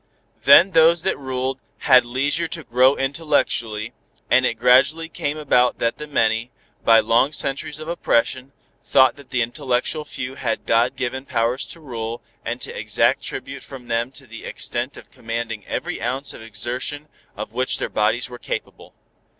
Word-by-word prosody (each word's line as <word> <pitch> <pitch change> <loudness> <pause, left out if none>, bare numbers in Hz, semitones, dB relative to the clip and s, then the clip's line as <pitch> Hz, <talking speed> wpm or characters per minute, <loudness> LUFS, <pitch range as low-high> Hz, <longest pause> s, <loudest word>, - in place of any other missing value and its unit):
Then 190 +3 +8
those 165 0 +5
that 190 - +1
ruled 130 0 -3 0.2
had 130 -3 +6
leisure 140 +7 0
to 165 0 -6
grow 130 +2 +4
intellectually, 135 -6 -1 0.4
and 130 0 +5
it - - -1
gradually 130 +7 +4
came 145 -2 -3
about 125 -5 +2
that 115 0 -1
the 150 - -6
many, 115 -4 +1 0.3
by 115 -1 +7
long 120 +6 +3
centuries 140 +1 -2
of 155 - -8
oppression, 130 -5 0 0.3
thought 130 -1 +4
that 140 -2 -16
the 125 -2 +1
intellectual 130 +4 -2
few 130 -3 -6
had 120 -4 -3
God 115 +2 +2
given 130 +2 -3
powers 115 +3 0
to 170 - -9
rule, 115 -5 -6 0.2
and - - -3
to - - -4
exact - - +1
tribute - - -6
from 130 -3 -11
them 115 +2 0
to 135 - -10
the 115 -2 -11
extent - - -4
of - - -14
commanding 115 -2 -5
every - - -4
ounce 135 +2 -2
of - - -11
exertion 120 +7 -4 0.3
of 105 +1 -6
which 130 +2 +1
their - - -2
bodies 110 +3 0
were 125 -1 -10
capable. - - -6
130 Hz, 165 wpm, -22 LUFS, 115-145 Hz, 0.4 s, Then